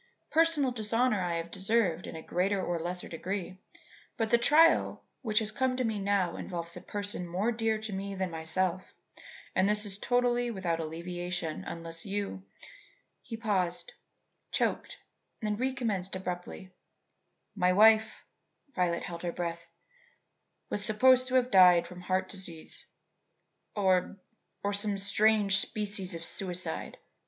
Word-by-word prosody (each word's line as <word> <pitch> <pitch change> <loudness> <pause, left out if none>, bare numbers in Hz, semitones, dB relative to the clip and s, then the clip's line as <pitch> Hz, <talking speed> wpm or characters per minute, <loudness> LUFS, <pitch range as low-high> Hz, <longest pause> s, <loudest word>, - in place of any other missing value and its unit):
Personal 320 -5 +3
dishonour 230 -1 +1
I 175 -1 -1
have 165 0 -4
deserved 190 -4 0
in - - -7
a 160 - -7
greater 195 +3 0
or 175 -2 -2
less 175 +2 -3
degree, 185 +2 -5 0.6
but 225 -1 -1
the 235 - +5
trial 315 +7 +4 0.2
which 215 -5 -2
has 215 -1 +3
come 255 +3 0
to 255 - 0
me 220 -3 -1
now 195 -3 0
involves 170 -2 -5
a - - -8
person 205 -3 -4
more 190 +7 0
dear 225 -1 0
to 215 -1 -5
me 195 +1 -4
than 190 -2 -2
myself, 170 +3 -2 0.6
and 190 +2 +3
is 210 -1 +1
totally 245 0 +1
without 180 -6 -2
alleviation 175 +1 -4
unless 165 -1 -7
you 200 - -3 0.4
" - - -31
He 225 - -7
paused, 205 - -1 0.6
choked, - - -1 0.4
then 210 -1 -1
recommenced 230 -8 -2
abruptly: 185 0 -6 0.8
"My 180 -3 +2
wife" 220 +3 +5 0.5
Violet 175 -2 0
held 170 -2 -6
her 175 - -2
breath 170 -1 -5 1.0
"was 205 - -2
supposed 255 +4 +4
to 260 - -1
have 255 -1 +3
died 180 -3 +7
from 180 0 -10
heart 185 +1 0
disease 175 -5 -7 0.9
or 190 -1 +2 0.5
or 205 0 0
some 200 0 +1
strange 200 0 +4
species 205 -4 -2
of 165 - -6
suicide. 180 -3 -4
195 Hz, 140 wpm, -30 LUFS, 180-220 Hz, 1.0 s, died